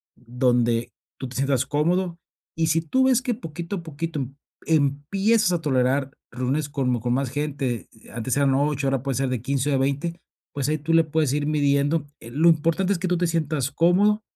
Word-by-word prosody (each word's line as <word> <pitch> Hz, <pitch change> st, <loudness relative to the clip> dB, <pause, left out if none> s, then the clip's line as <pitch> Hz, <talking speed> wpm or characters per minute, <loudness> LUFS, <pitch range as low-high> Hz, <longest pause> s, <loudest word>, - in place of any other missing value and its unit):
donde 120 Hz, -1 st, 0 dB, 0.3 s
tú 130 Hz, -, -4 dB
te 125 Hz, -, -11 dB
sientas 135 Hz, -1 st, +1 dB
cómodo. 170 Hz, +5 st, 0 dB, 0.4 s
Y 160 Hz, 0 st, +1 dB
si 160 Hz, +1 st, +2 dB
tú 260 Hz, +11 st, +1 dB
ves 255 Hz, -1 st, +4 dB
que 250 Hz, -2 st, -1 dB
poquito 170 Hz, -1 st, -6 dB
a 170 Hz, -, -7 dB
poquito 160 Hz, 0 st, -4 dB
em 135 Hz, +2 st, -6 dB, 0.3 s
empiezas 165 Hz, +8 st, +2 dB
a 170 Hz, -, 0 dB
tolerar 135 Hz, -1 st, +1 dB, 0.2 s
reuniones 130 Hz, +4 st, -1 dB
como 125 Hz, -4 st, 0 dB
con 120 Hz, +1 st, 0 dB
más 135 Hz, 0 st, 0 dB
gente, 135 Hz, -4 st, -3 dB, 0.3 s
antes 115 Hz, +2 st, -2 dB
eran 140 Hz, -1 st, +3 dB
8, 140 Hz, 0 st, 0 dB
ahora 135 Hz, -2 st, 0 dB
puede 135 Hz, -2 st, -2 dB
ser 135 Hz, +1 st, 0 dB
de 125 Hz, -3 st, -2 dB
15 135 Hz, +2 st, -1 dB
o -, -, +1 dB
de -, -, +3 dB
20, 140 Hz, +6 st, -1 dB, 0.3 s
pues, 140 Hz, -2 st, -2 dB
ahí 155 Hz, -, +1 dB
tú 155 Hz, +3 st, -1 dB
le 165 Hz, 0 st, +6 dB
puedes 155 Hz, -3 st, 0 dB
ir 145 Hz, 0 st, 0 dB
midiendo, 145 Hz, 0 st, +1 dB
eh, 115 Hz, -, -11 dB
lo 160 Hz, +6 st, +4 dB
importante 165 Hz, +4 st, +2 dB
es 175 Hz, -, -3 dB
que 185 Hz, -, -2 dB
tú 180 Hz, -, +1 dB
te 175 Hz, 0 st, +1 dB
sientas 155 Hz, -5 st, -1 dB
cómodo 195 Hz, +7 st, +3 dB
145 Hz, 205 wpm, -24 LUFS, 135-165 Hz, 0.4 s, le